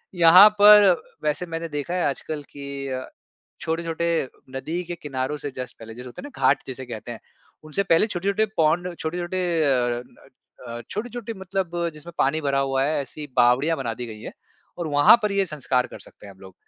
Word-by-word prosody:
यहाँ 180 +4 +9
पर 205 -3 +8 0.2
वैसे 150 +4 -1
मैंने 165 0 -5
देखा 150 +3 -4
है 180 - 0
आजकल 145 +1 -5
कि 140 -1 -7
अ, 130 0 -4 0.6
छोटे-छोटे 165 -1 -1 0.3
नदी 165 +6 -3
के 175 0 -5
किनारों 135 0 -3
से 145 - -5
जस्ट 125 0 -6
पहले 115 0 -10
जैसे 125 +2 -9
होता 120 - -10
है - - -8
ना - - 0
घाट - - +3
जिसे 130 -1 -7
कहते 120 0 -7
हैं। 110 - -10 0.4
उनसे 155 +6 -1
पहले 180 +1 +3
छोटे-छोटे 200 +2 0
पोंड 170 +3 +1
छोटे-छोटे 175 +3 -3 0.2
अ 120 -3 +1 0.7
अ, 120 0 -6
छोटे-छोटे 235 +1 -5
मतलब 190 -2 -3 0.2
जिसमें 155 +3 -11
पानी 145 +4 +2
भरा 140 -2 0
हुआ 135 -1 0
है 150 +1 0
ऐसी 150 +2 -9
बावड़ियाँ 125 +7 +4
बना 120 -4 -2
दी 125 0 -6
गई 110 -1 -9
हैं। - - -7 0.5
और 170 - -3
वहाँ 145 +7 +7
पर 210 -1 0
ये 200 0 +2
संस्कार 135 -5 -1
कर - - -10
सकते - - -15
हैं 100 - -11
हम 95 - -24
लोग। 95 -1 -13
155 Hz, 195 wpm, -24 LUFS, 130-175 Hz, 0.7 s, यहाँ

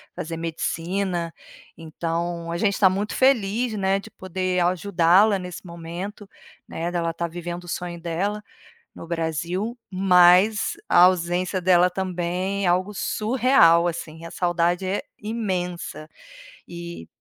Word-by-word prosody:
fazer 165 +1 -5
medicina, 170 +1 -2 0.4
então 170 +1 -4
a 170 - -2
gente 200 +1 0
tá 190 - +7
muito 200 +3 -2
feliz, 240 -3 +2
né, 195 -1 +1
de - - -12
poder 185 0 -2
ajudá-la 185 +2 +3
nesse 180 0 -8
momento, 175 +4 -7 0.4
né, 170 +2 -4
dela 170 -1 -1
estar 170 +1 -3
vivendo 175 +1 -6
o - - -13
sonho 175 -1 -4
dela, 190 +5 -2 0.5
no - - -10
Brasil, 170 +7 -2
mas 185 +2 +5
a - - +5
ausência 180 +1 +1
dela 180 0 +4
também 185 +1 -2
é - - +3
algo 185 +3 +1
surreal 215 -6 +3
assim, 160 -1 -6
a - - -9
saudade 175 +1 0
é 190 +2 -1 0.2
imensa, 185 -7 -4 0.6
e 170 - -8
180 Hz, 130 wpm, -23 LUFS, 170-195 Hz, 0.6 s, tá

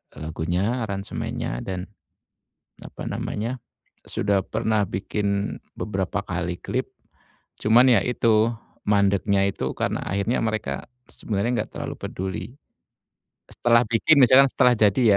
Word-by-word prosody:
lagunya, 85 +9 -2
aransemennya, 100 -10 -4
dan, 95 -1 -4 1.0
apa - - -8
namanya, 115 +5 -3 0.5
sudah 100 -1 +1
pernah 110 -1 0
bikin 100 +2 -2 0.2
beberapa 95 -1 -2
kali 90 -1 -3
klip, - - -3 0.7
cuman 120 +4 +6
ya 110 - +5
itu, 115 -3 +3 0.4
mandeknya 100 -1 +3
itu - - -3
karena - - -1
akhirnya 100 +5 0
mereka, 110 -1 -2 0.3
sebenarnya 105 +2 -2
enggak - - -8
terlalu - - -5
peduli. 95 -1 -4 1.0
Setelah 120 0 +3
bikin 145 +7 +4
misalnya 130 +2 +8
setelah 125 -1 +4
jadi 105 +3 +3
105 Hz, 110 wpm, -24 LUFS, 95-115 Hz, 1.0 s, misalnya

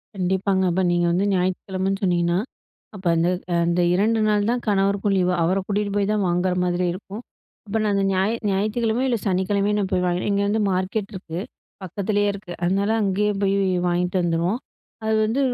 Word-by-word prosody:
கண்டிப்பாங்க. 190 +1 0
அப்ப 190 +2 +1
நீங்க 175 0 +2
வந்து 185 +3 +1
ஞாயித்துக்கிழமைன்னு 190 +2 -1
சொன்னிங்கன்னா. 175 -1 +2 0.6
அப்போ 185 -2 -5
அந்த 165 +1 +2 0.4
அந்த 175 +1 +1
2 220 +4 +2
நாள் 210 0 +2
தான் 245 0 -1
கணவருக்கும் 200 0 +1
லீவு. 180 0 +2
அவர 185 +4 +2
கூட்டிட்டு 205 0 -1
போய் 205 0 +1
தான் 210 -2 +1
வாங்குற 180 +1 +1
மாதிரி 180 0 0
இருக்கும். 205 +4 -8 0.4
அப்ப 210 +1 -2
நான் 205 -1 +1
அந்த 195 - +1
ஞா 185 - +2 0.3
ஞாயிற்றுக்கிழமையோ 220 +5 0
இல்ல 235 - +1
சனிக்கிழமையோ 200 +2 +1
நான் 195 - -1
போய் 180 - +1
வாங்கி 175 0 0
இங்க 200 - +1
வந்து 215 +1 +1
மார்க்கெட் 195 +3 -2
இருக்கு. 175 -3 -6 0.4
பக்கத்திலேயே 205 +3 -1
இருக்கு. 195 -2 -9
அதனால 195 +4 +1
அங்கேயே 205 +1 +1
போய் 195 0 +2 0.3
வாங்கிட்டு 180 +1 0
வந்துருவோம். 170 +7 0 0.5
அது 220 - +2
வந்து 225 +5 -1
195 Hz, 170 wpm, -23 LUFS, 180-205 Hz, 0.6 s, நீங்க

